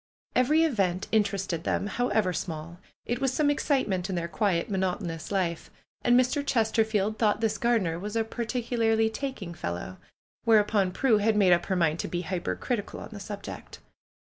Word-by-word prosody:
Every 300 +6 +4
event 195 - 0
inter 210 -2 +2
ested 180 -4 -3
them, 195 - -1
however 210 -4 0
small. 165 0 -5 0.3
It 240 +2 -2
was 270 -2 +2
some 290 +2 +2
excitement 215 - 0
in 190 - -2
their 170 -1 -2
quiet, 175 -2 0
monotonous 185 -4 -2
life. 180 -4 -1 0.3
And 245 +1 +5
Mr. 255 +3 +1
Chesterfield 220 -4 +1
thought 210 -2 +2
this 225 -2 0
gardener 210 -9 +1
was 205 +3 -5
a 225 - +2
particularly 225 -1 0
taking" 225 -9 -5
fel 85 - -3
low. 95 +1 -7 0.5
Whereupon 210 -3 +3
Prue 225 +2 +3
had 215 +1 +2
made 190 -4 +6
up 175 0 +1
her 190 - 0
mind 165 -2 +1
to - - -2
be 175 - -2
hypercritical 195 +5 -3
on - - -8
the 210 - -8
subject. 200 0 -8
210 Hz, 170 wpm, -27 LUFS, 180-230 Hz, 0.5 s, made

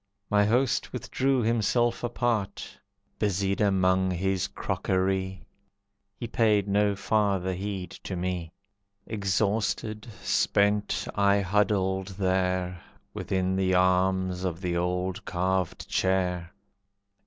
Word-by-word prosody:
My 105 0 +4
host 125 +4 +1
withdrew 130 -2 0
himself 120 +2 +1
apart; 120 -4 -2 0.4
Busied 100 -1 0
among 95 -2 +3
his 95 +1 0
crockery, 95 0 -1 0.7
He 120 - -6
paid 110 -3 +2
no 100 0 +2
farther 100 -2 +1
heed 95 0 -4
to 95 - -3
me. 90 -2 -3 0.5
Exhausted, 105 +1 -1 0.2
spent, 105 0 +1
I 100 0 +3
huddled 95 -1 +1
there, 90 -2 0 0.3
Within 95 -1 -1
the 95 -1 +2
arms 95 0 +2
of 90 -3 -2
the 90 -2 -2
old 90 +3 -1
carved 95 -1 -1
chair. 90 -2 0
95 Hz, 100 wpm, -27 LUFS, 90-105 Hz, 0.7 s, My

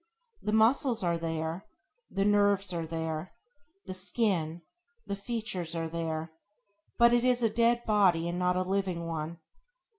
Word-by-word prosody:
The 210 - -2
muscles 230 +2 +3
are 170 -1 +1
there; 165 +1 -3 0.4
the 195 0 0
nerves 200 -2 +3
are 165 -1 -3
there; 160 +1 -4 0.5
the 185 - -5
skin, 185 -4 -1 0.4
the 200 - -3
features 200 -5 -3
are 165 -1 -2
there; 160 -1 -3 0.7
but 235 0 +6
it 240 0 +3
is 250 -1 +2
a 225 - +3
dead 235 +1 +2
body 185 -6 +3
and 175 +1 -2
not 180 0 +2
a 185 - +1
living 185 -3 -1
one. 165 0 -4
185 Hz, 150 wpm, -30 LUFS, 165-215 Hz, 0.7 s, but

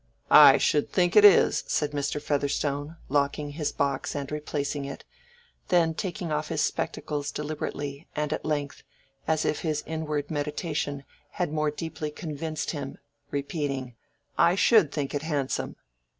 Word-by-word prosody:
"I - - +10
should 150 - +1
think 175 -2 +2
it 210 - +8
is," 205 -3 +6
said 150 -1 0
Mr. 145 0 -2
Featherstone, 145 +1 -1
locking 145 +1 0
his 150 0 -2
box 140 0 -1
and 140 -1 -4
replacing 150 -1 -3
it, 140 0 -7 0.6
then 170 -2 +3
taking 180 0 -4
off 150 0 -1
his 155 -2 -1
spectacles 145 -1 -2
deliberately, 145 -1 -5
and 150 0 -1
at - - -4
length, 145 -2 -2 0.5
as 155 -1 +1
if - - 0
his 155 -2 -2
inward 155 -2 -3
meditation 150 -1 -2 0.3
had 175 -4 -2
more 155 -1 +1
deeply 155 0 -5
convinced 155 0 -4
him, 140 -4 -6 0.3
repeating, 140 -3 -3 0.5
"I 175 - +5
should 200 - +5
think 145 -3 -3
it 145 - -1
handsome." 145 -4 -2
150 Hz, 145 wpm, -27 LUFS, 145-160 Hz, 0.6 s, I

